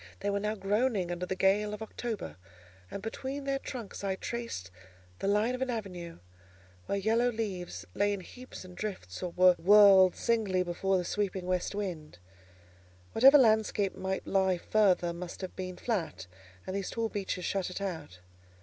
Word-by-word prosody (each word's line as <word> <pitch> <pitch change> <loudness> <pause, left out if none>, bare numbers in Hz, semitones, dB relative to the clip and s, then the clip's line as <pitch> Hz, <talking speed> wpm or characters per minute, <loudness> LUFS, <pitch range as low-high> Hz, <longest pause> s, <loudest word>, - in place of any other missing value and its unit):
They 205 - 0
were 200 - 0
now 210 +1 -1
groaning 205 -2 0
under 175 +1 -3
the 190 - -2
gale 205 +3 +2
of 210 - -13
October, 220 - -5 0.5
and 200 - -7
between 265 +5 -4
their 275 0 -1
trunks 235 -8 -7
I 195 -1 0
traced 230 - -5 0.5
the - - -2
line 210 +4 +2
of 255 - -4
an 260 - 0
avenue, 180 -7 -5 0.7
where 200 - 0
yellow 225 +5 +2
leaves 185 - -4
lay 205 0 +2
in 200 -2 -3
heaps 250 +1 -11
and 180 -1 -12
drifts, 185 - -5
or 180 - -2
were 180 +1 +5
whirled 195 0 +7
singly 210 -6 +1
before 185 +2 0
the 180 - -2
sweeping 195 -1 -2
west 185 +2 -1
wind. 170 - -5 0.9
Whatever 270 +5 +8
landscape 220 -5 +3
might 190 0 -3
lie 190 -2 +2
further 180 -3 +2
must 175 +2 -7
have 185 - -6
been 185 -1 -5
flat, 165 - -2 0.4
and 185 - -4
these 195 -1 -2
tall 230 -1 -1
beeches 190 -4 -3
shut 195 -2 -1
it 185 - -5
out. 160 - -5
195 Hz, 170 wpm, -30 LUFS, 180-220 Hz, 0.9 s, Whatever